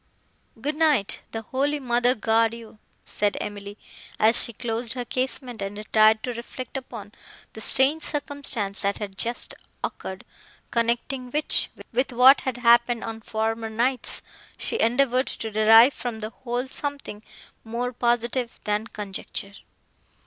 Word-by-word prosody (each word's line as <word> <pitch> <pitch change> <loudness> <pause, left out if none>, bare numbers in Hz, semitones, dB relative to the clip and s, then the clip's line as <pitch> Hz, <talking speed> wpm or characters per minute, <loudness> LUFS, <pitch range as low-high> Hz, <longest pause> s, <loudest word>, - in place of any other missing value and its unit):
"Good 295 - -2
night; 295 -11 +2
the 225 0 -5
holy 280 +5 -1
mother 245 -1 +2
guard 225 0 +2
you!" 225 -2 -13 0.3
said 205 -1 0
Emily, 205 0 -7 0.4
as 225 +2 +5
she - - -2
closed 230 0 -2
her 250 -2 -4
casement 255 -2 -2
and 195 +1 -4
retired 215 +1 +4
to 250 - -3
reflect 240 +2 -8
upon 230 -6 -7 0.4
the 220 - -8
strange 275 +7 +4
circumstance 280 -10 0
that 200 0 0
had 200 -2 -6
just 235 +5 -1 0.3
occurred, 190 0 -5 0.5
connecting 240 +2 -1
which 300 +4 +1 0.2
with 255 +3 +1
what 255 +3 +7
had 260 -2 -3
happened 235 -1 +4
on 225 0 -6
former 225 +1 -2
nights, 245 +4 0 0.3
she - - -1
endeavoured 255 +2 +2
to 220 - -5
derive 225 +5 +7
from 240 -3 -5
the 215 0 -5
whole 245 +1 -4
something 280 -6 -4 0.4
more 240 +2 -3
positive, 240 0 0
than 210 +2 -1
conjecture. 200 -1 -6
235 Hz, 140 wpm, -25 LUFS, 220-255 Hz, 0.5 s, what